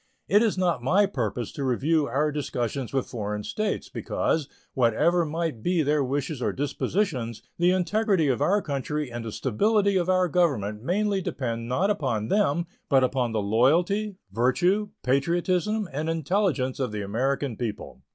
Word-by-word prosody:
It 205 Hz, +2 st, +5 dB
is 220 Hz, -4 st, +1 dB
not 175 Hz, -8 st, +1 dB
my 185 Hz, +11 st, +3 dB
purpose 120 Hz, -, -3 dB
to 140 Hz, -, -5 dB
review 145 Hz, +4 st, +1 dB
our 150 Hz, +2 st, +1 dB
discussions 135 Hz, -3 st, -3 dB
with 135 Hz, -2 st, 0 dB
foreign 105 Hz, -3 st, -4 dB
states, 215 Hz, -, -2 dB
because, 155 Hz, -4 st, -1 dB, 0.2 s
whatever 150 Hz, +9 st, +3 dB
might 160 Hz, -6 st, -3 dB
be 175 Hz, +1 st, +1 dB
their 150 Hz, 0 st, +2 dB
wishes 140 Hz, +1 st, -2 dB
or -, -, +1 dB
dispositions, 140 Hz, -, -2 dB, 0.2 s
the 175 Hz, +1 st, +4 dB
integrity 185 Hz, -1 st, +2 dB
of 125 Hz, -5 st, 0 dB
our 205 Hz, +1 st, +2 dB
country 145 Hz, -1 st, -3 dB
and 120 Hz, 0 st, -5 dB
the 115 Hz, -, -5 dB
stability 200 Hz, -, +2 dB
of 180 Hz, 0 st, 0 dB
our 185 Hz, -1 st, +3 dB
Government 130 Hz, -, 0 dB
mainly 195 Hz, -, 0 dB
depend 115 Hz, -8 st, -3 dB
not 185 Hz, +11 st, +2 dB
upon 120 Hz, -, -1 dB
them, 170 Hz, -5 st, +2 dB, 0.2 s
but 135 Hz, -2 st, +4 dB
on 125 Hz, -3 st, +1 dB
the 110 Hz, -2 st, -1 dB
loyalty, 170 Hz, -, +2 dB, 0.2 s
virtue, 175 Hz, -, +2 dB
patriotism, 175 Hz, +9 st, +1 dB
and 155 Hz, +3 st, -2 dB
intelligence 165 Hz, -5 st, 0 dB
of 130 Hz, -4 st, -1 dB
the 105 Hz, -1 st, -3 dB
American 130 Hz, +5 st, -1 dB
people. 110 Hz, -2 st, -5 dB
145 Hz, 160 wpm, -26 LUFS, 125-180 Hz, 0.2 s, It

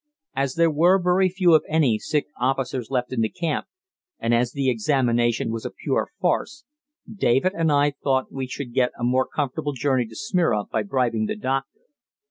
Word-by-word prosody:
As 135 Hz, -1 st, -1 dB
there 165 Hz, -1 st, +3 dB
were 170 Hz, +5 st, +4 dB
very 180 Hz, +1 st, +3 dB
few, 180 Hz, -2 st, +3 dB
if 155 Hz, -, +6 dB
any, 145 Hz, -9 st, +2 dB
sick 150 Hz, +7 st, -1 dB
officers 130 Hz, -1 st, -1 dB
left 125 Hz, -1 st, -2 dB
in 120 Hz, -, 0 dB
the 110 Hz, -, +1 dB
camp, 165 Hz, +2 st, -3 dB, 0.5 s
and 115 Hz, -, 0 dB
as 120 Hz, +1 st, +2 dB
the 140 Hz, -1 st, -2 dB
examination 120 Hz, -1 st, +1 dB
was 115 Hz, 0 st, -4 dB
a -, -, -3 dB
pure -, -, -2 dB
farce, 300 Hz, 0 st, -1 dB, 0.4 s
David 185 Hz, -, +1 dB
and 165 Hz, -2 st, +1 dB
I 145 Hz, 0 st, +3 dB
thought 130 Hz, -2 st, +1 dB
we 135 Hz, -1 st, -4 dB
should 125 Hz, -1 st, -6 dB
get 125 Hz, -1 st, +1 dB
a -, -, -6 dB
more 130 Hz, +2 st, +2 dB
comfortable 145 Hz, +1 st, -3 dB
journey 130 Hz, -3 st, 0 dB
to 110 Hz, -, -13 dB
Smyrna 180 Hz, -, 0 dB
by 110 Hz, -, -2 dB
bribing 115 Hz, -1 st, 0 dB
the -, -, -2 dB
doctor. 135 Hz, +4 st, -3 dB
135 Hz, 185 wpm, -23 LUFS, 120-155 Hz, 0.5 s, if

